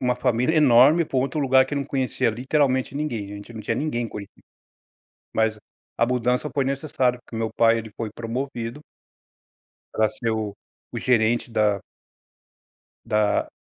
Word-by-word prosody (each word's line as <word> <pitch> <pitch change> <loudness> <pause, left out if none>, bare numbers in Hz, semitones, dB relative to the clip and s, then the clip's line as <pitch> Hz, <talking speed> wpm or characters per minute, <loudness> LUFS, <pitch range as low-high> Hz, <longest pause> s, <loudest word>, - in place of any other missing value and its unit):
uma 125 -1 +1
família 125 +5 +1
enorme 145 +3 +6
pra 135 - -4
um - - +3
outro 135 +3 -2
lugar 130 -1 +5
que 145 - -4
não 140 -1 -1
conhecia 130 -4 0
literalmente 130 +2 0
ninguém. 120 -9 -3
A - - -6
gente 100 +3 -11
não 110 - -6
tinha - - -1
ninguém 145 -6 -1
em - - -5
Curi 100 -1 -7 1.1
Mas, 110 -1 +1 0.4
a 115 - +5
mudança 125 +3 0
foi 140 - +1
necessário 135 -2 0
porque 115 - -10
meu 110 0 -1
pai 115 0 +4
ele 110 -1 -7
foi 115 -2 -3
promovido 120 +2 -4 1.1
pra 110 -1 +2
ser 115 +2 -3
o 110 -2 -3 0.3
o - - -7
gerente 120 -1 +1
da 105 -3 +1 1.2
da 105 -2 +1
120 Hz, 165 wpm, -24 LUFS, 110-135 Hz, 1.2 s, enorme